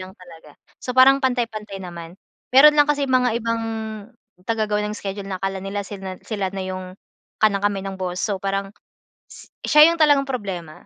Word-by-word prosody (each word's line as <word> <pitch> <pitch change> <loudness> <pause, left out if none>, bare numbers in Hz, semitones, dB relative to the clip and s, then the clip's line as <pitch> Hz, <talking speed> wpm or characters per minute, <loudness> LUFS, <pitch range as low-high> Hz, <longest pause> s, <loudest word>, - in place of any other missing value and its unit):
lang 185 0 -9
talaga. 165 -5 -15 0.3
So, 250 - -3
parang 270 +1 +7
pantay-pantay 225 -6 -2
naman. 170 -1 -9 0.4
Mayroon 300 +3 +8
lang 290 - +6
kasi 285 -1 0
mga 250 -2 +2
ibang 230 0 -2 0.8
tagagawa 215 -2 0
ng 210 - -4
schedule 195 0 -6
na 185 -1 -5
akala 195 0 -2
nila 200 +1 -4
sinan 190 -2 -8
sila 200 -4 -2
na 195 - -3
'yong 185 0 -6 0.5
kanang-kamay 200 -1 +2
ng 195 -1 -5
boss. 180 0 -3
So, 200 -3 -1
parang 195 0 -2 0.6
s - - -14 0.2
siya 300 +1 +7
'yong 335 - -1
talagang 285 -2 +4
problema, 180 -10 -6
200 Hz, 170 wpm, -22 LUFS, 185-245 Hz, 0.8 s, Mayroon